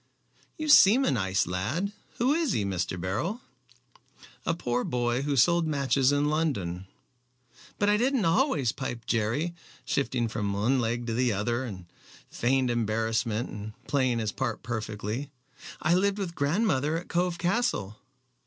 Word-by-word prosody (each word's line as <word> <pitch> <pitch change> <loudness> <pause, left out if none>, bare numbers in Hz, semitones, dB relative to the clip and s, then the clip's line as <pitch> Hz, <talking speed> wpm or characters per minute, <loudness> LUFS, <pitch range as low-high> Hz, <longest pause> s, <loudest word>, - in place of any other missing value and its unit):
"You 310 - -4
seem 260 -2 +7
a - - +2
nice 95 -6 +1
lad. 115 - -2 0.3
Who 255 +4 +3
is 320 -3 +1
he, 105 - 0
Mr. 90 -2 -2
Beryl?" 110 - -2 1.1
"A 165 - +2
poor 125 -6 -1
boy 120 0 0
who 140 0 -1
sold 170 +5 +4
matches 140 -2 +2
in 145 0 +2
London." 100 - -1 0.9
"But 205 - +1
I 210 0 +4
didn't 250 -2 +1
always," 165 - +2
piped 120 -3 -6
Jerry, 120 +10 0 0.3
shifting 125 -4 0
from 105 -2 -2
one 115 +7 +1
leg 120 0 -1
to 115 - -2
the 125 +1 +2
other 115 +5 -1
in 95 -7 -8 0.5
feigned 130 +1 +1
embarrassment, 115 0 -1
and 105 +1 -7
playing 130 -4 +1
his 110 -2 -1
part 110 - -3
perfectly. 110 +3 -4 0.5
"I 170 - +3
lived 200 +2 +2
with 190 -4 -3
grandmother 150 -1 +1
at 175 - -7
Cove 175 0 0
Castle." 175 - -1
130 Hz, 150 wpm, -28 LUFS, 110-170 Hz, 1.1 s, seem